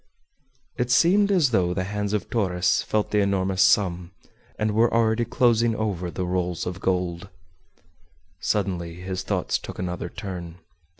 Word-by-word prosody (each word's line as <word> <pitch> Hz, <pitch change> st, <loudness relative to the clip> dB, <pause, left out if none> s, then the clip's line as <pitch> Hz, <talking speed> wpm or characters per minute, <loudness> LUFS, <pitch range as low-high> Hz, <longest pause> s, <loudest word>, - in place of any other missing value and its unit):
It 125 Hz, 0 st, -1 dB
seemed 195 Hz, +10 st, +4 dB
as 165 Hz, -9 st, +3 dB
though 90 Hz, -5 st, +1 dB
the 95 Hz, -, -1 dB
hands 105 Hz, +1 st, -3 dB
of 105 Hz, -, -1 dB
Torres 90 Hz, -5 st, +1 dB
felt 105 Hz, -1 st, -1 dB
the 105 Hz, -, +2 dB
enormous 95 Hz, -1 st, +1 dB
sum, 90 Hz, -3 st, +3 dB, 0.5 s
and 110 Hz, 0 st, 0 dB
were 115 Hz, +3 st, +3 dB
already 115 Hz, 0 st, +2 dB
closing 120 Hz, -1 st, +2 dB
over 100 Hz, -5 st, -2 dB
the 90 Hz, +1 st, -3 dB
rolls 90 Hz, -1 st, -2 dB
of 90 Hz, +1 st, -5 dB
gold. 90 Hz, -1 st, -1 dB, 1.1 s
Suddenly 85 Hz, -2 st, -1 dB
his 95 Hz, +1 st, -5 dB
thoughts 95 Hz, -1 st, -1 dB
took -, -, -9 dB
another 90 Hz, -1 st, -4 dB
turn. 90 Hz, -4 st, -7 dB
95 Hz, 145 wpm, -24 LUFS, 90-110 Hz, 1.1 s, seemed